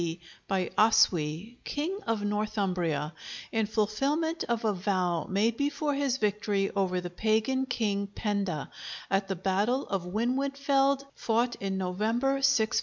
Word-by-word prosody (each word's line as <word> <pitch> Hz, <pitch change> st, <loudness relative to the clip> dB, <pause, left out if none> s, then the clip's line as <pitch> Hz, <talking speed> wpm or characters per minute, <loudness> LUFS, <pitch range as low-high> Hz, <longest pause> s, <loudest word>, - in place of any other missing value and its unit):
D. 170 Hz, 0 st, -2 dB, 0.3 s
by 185 Hz, -2 st, 0 dB
Oswy, 200 Hz, 0 st, +3 dB
King 340 Hz, +7 st, -2 dB
of 225 Hz, -2 st, 0 dB
Northumbria, 185 Hz, -8 st, -1 dB, 0.4 s
in 220 Hz, -2 st, +1 dB
fulfilment 275 Hz, +10 st, 0 dB
of 235 Hz, -1 st, -1 dB
a 215 Hz, -, +3 dB
vow 180 Hz, -4 st, 0 dB
made 220 Hz, +4 st, +1 dB
before 290 Hz, +1 st, 0 dB
his 275 Hz, -2 st, 0 dB
victory 205 Hz, -2 st, 0 dB
over 185 Hz, -2 st, +1 dB
the 175 Hz, 0 st, -6 dB
pagan 220 Hz, +7 st, +1 dB
king 205 Hz, -5 st, 0 dB
Penda, 200 Hz, -6 st, -2 dB, 0.4 s
at 195 Hz, 0 st, +2 dB
the 195 Hz, -, -2 dB
battle 200 Hz, +8 st, +1 dB
of 195 Hz, -2 st, 0 dB
Winwidfield, 275 Hz, +5 st, +1 dB
fought 235 Hz, +2 st, +1 dB
in 195 Hz, -1 st, -2 dB
November, 225 Hz, +9 st, 0 dB
654. 220 Hz, -4 st, +3 dB
215 Hz, 135 wpm, -29 LUFS, 190-255 Hz, 0.4 s, Oswy